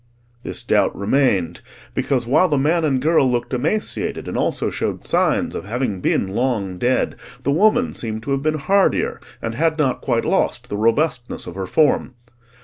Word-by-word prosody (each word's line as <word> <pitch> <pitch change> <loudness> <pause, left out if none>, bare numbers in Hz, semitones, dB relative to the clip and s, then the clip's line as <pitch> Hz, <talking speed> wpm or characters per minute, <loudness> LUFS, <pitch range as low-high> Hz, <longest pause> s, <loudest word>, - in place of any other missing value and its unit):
This - - -5
doubt - - +2
remained, 100 - +1 0.3
because 130 -3 0
while 140 +9 +3
the 145 - +2
man 160 +5 +2
and 140 -4 +1
girl 150 -1 +3
looked 120 +1 -2
emaciated 160 - -1
and - - -4
also - - 0
showed - - -3
signs - - +1
of - - -5
having 115 -2 -2
been 95 - +1
long 100 -5 -1
dead, 125 +1 0 0.3
the 140 - +1
woman 215 - +3
seemed 110 -1 -4
to 140 - -4
have 135 0 0
been 155 +1 0
hardier, 195 +6 +1 0.2
and 115 - -2
had 160 +5 +1
not 135 -5 0
quite 120 -3 0
lost 125 -10 0
the - - -3
robustness 120 +4 0
of - - -7
her 95 0 -5
form. 145 - +2
130 Hz, 175 wpm, -20 LUFS, 115-155 Hz, 0.3 s, while